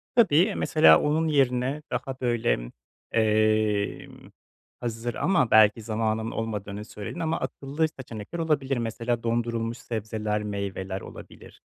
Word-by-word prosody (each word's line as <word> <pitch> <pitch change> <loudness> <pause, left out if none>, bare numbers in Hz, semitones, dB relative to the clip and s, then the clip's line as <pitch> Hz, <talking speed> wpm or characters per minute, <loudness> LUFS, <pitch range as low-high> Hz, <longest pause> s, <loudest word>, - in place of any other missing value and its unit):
Tabii. 225 -11 +5
Eee, 195 +4 +3
mesela 80 - +6
onun 155 +2 +1
yerine 135 -1 +1
daha 130 +2 -3
böyle, 110 - 0 0.4
emm, 110 -1 +1 0.5
hazır 120 0 -4
ama 170 -11 +2
belki 110 +1 +6
zamanın 110 0 -1
olmadığını 105 -2 -4
söyledin 105 - -7
ama 165 0 -1
akıllı 145 +4 -2
seçenekler 120 +4 -7
olabilir. 140 -5 0
Mesela 115 +1 -2
dondurulmuş 115 0 -1
sebzeler, 110 -2 -3
meyveler 100 -2 -4
olabilir. - - -12
115 Hz, 115 wpm, -26 LUFS, 105-135 Hz, 0.5 s, mesela